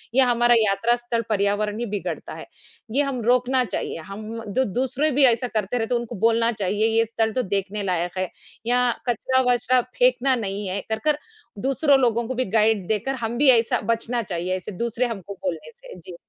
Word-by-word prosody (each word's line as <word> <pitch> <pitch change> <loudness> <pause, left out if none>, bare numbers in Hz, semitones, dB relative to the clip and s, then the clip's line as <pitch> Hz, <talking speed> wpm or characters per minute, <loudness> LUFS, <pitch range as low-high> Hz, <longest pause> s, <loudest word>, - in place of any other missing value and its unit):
ये 265 - +6
हमारा 240 -1 +4
यात्रा 220 +2 +2
स्थल 240 -1 -2
पर्यावरण 210 +1 0
ही 240 - -1
बिगड़ता 205 -3 -5
है, - - -8 0.5
ये 270 +5 +2
हम 270 -3 -3
रोकना 250 +1 +3
चाहिए। - - -4
हम 215 +3 -6
द 260 - +2
दूसरे 265 +4 0
भी 280 +1 +3
ऐसा 245 0 +2
करते 215 0 -2
रहते 230 +1 0
उनको 235 0 -3
बोलना 230 0 +3
चाहिए। 210 0 0
ये 230 - +4
स्थल 225 0 -1
तो 255 - +1
देखने 200 +1 -2
लायक 180 -1 -2
है, 185 -1 -1 0.4
यहाँ 245 0 +2 0.2
कचरा-वचरा 250 +1 +2 0.2
फेंकना 255 +1 +3
नहीं 200 -3 -4
है 190 +2 -2
कर-कर 225 +7 0 0.5
दूसरों 275 0 +3
लोगों 235 -2 +1
को 260 - -3
भी 255 +1 0
गाइड 215 -4 +2
देकर 220 +5 -1
हम 230 +2 -3
भी 285 +1 +5
ऐसा 225 - 0
बचना 235 +1 -2
चाहिए। 180 -1 -2
ऐसे 185 - -8
दूसरे 235 +1 0
हमको 200 -4 -6
बोलने 165 -5 -5
से, - - -13
जी। 175 +1 -10
230 Hz, 190 wpm, -23 LUFS, 205-250 Hz, 0.5 s, ये